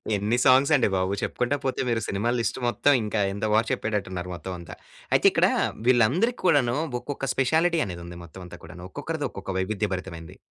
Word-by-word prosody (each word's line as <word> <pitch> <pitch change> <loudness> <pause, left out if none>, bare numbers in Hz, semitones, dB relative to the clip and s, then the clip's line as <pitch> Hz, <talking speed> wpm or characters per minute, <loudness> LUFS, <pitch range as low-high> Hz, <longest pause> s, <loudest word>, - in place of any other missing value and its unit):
ఎన్ని 105 +4 0
సాంగ్స్ 135 +2 +5
అండి 130 - +3
బాబు! 95 +1 0
చెప్పుకుంటా 125 +3 -1
పోతే 130 - -1
మీరు 115 -1 0
సినిమా 100 +4 -1
లిస్ట్ 115 - -2
మొత్తం 145 +4 +3
ఇంకా 105 0 -1
ఇంత 100 +2 -3
బారు 110 +1 +3
చెప్పేటట్టున్నారు 95 -4 -3
మొత్తం 95 +2 -7
అంతా. 85 - -10 0.4
అయితే - - +5
ఇక్కడ - - +3 0.4
వీళ్ళందరికీ 130 - +3
కూడాను 140 -8 +3 0.3
ఒక్కొక్క 140 -1 -5
స్పెషాలిటీ 160 +5 +2
అనేదుంది 85 -1 -8
మొత్తం 85 +3 -12
అంతా - - -11
కూడాను. 90 +2 -10
ఒక్కొక్కరిది - - -3
ఒక్కొక్క 95 - -6
వైవిధ్య 105 +2 -1
భరితమైనది. 85 -3 -7
110 Hz, 170 wpm, -25 LUFS, 95-130 Hz, 0.4 s, సాంగ్స్